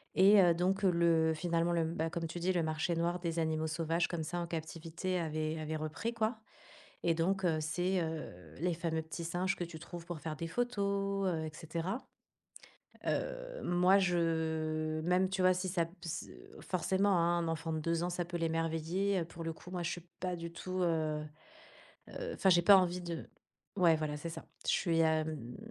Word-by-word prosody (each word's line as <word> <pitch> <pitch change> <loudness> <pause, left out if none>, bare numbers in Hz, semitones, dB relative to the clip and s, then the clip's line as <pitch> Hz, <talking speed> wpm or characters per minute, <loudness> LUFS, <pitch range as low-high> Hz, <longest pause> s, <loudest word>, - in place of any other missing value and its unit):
et 195 +2 +8
heu, 175 -2 +6
donc 185 +3 +1
le 170 -3 +4
finalement 170 +1 +1
le 170 -1 +2
m 160 0 -1
bah, 165 0 -1
comme 170 0 -3
tu 170 +2 -6
dis, 180 +2 +1
«Le 175 -2 +1
marché 160 +2 0
noir 170 +2 0
des 170 -1 -2
animaux 160 -1 0
sauvages», 165 +2 0
comme 170 -2 -3
ça, 175 +3 -3
en 170 - -3
captivité, 165 +2 -3
avait 155 -1 -2
avait 155 0 -3
repris, 155 +10 -3
quoi! 220 0 0 0.6
Et 170 - +3
donc 190 +4 +1
heu, 165 -3 +3
c'est, 180 +4 0
heu, 90 - -6
les 175 +1 +1
fameux 160 -1 -1
petits 160 +2 -6
singes 180 +3 0
que 175 - -2
tu 165 -1 -8
trouves 175 0 -8
pour 170 -2 -6
faire 155 -1 -4
des 165 +3 -4
photos, 200 -3 0
heu, 160 -3 -1
et - - -4
cetera. 165 +7 -3 1.1
Heu, - - -2
moi 180 +2 +5
je 160 -3 0
même 180 +3 +3
tu 190 0 -1
vois 185 0 +6
si 185 +1 -2
ça 175 -2 +1
p 170 - -17
s 170 - -4 0.3
forcément, 190 +2 +1
hein, 170 +1 +3
un 165 - -1
enfant 165 0 -2
de 160 - -1
2 165 +1 0
ans, 175 - -1
ça 175 0 -1
peut 175 0 -5
l'émerveiller, 165 +4 0
heu, - - -1
pour 165 0 -9
le 165 - -2
coup, 175 - -13
moi, 180 -1 -2
je - - 0
suis 175 0 -6
pas 180 -1 -1
du 170 0 -6
tout, 185 +2 -4
heu 155 -3 0 0.9
heu - - -5
enfin, 190 - +3
j'ai 175 -1 +6
pas 200 +2 +9
envie 180 -1 +1
de 170 -2 -5 0.5
ouais, 170 -3 +6
voilà! 155 -1 -2
C'est 165 +3 -5
ça. 165 - -8 0.2
Je - - +4
suis, 165 -3 +2
hem, 155 -6 0
170 Hz, 205 wpm, -34 LUFS, 160-180 Hz, 1.1 s, pas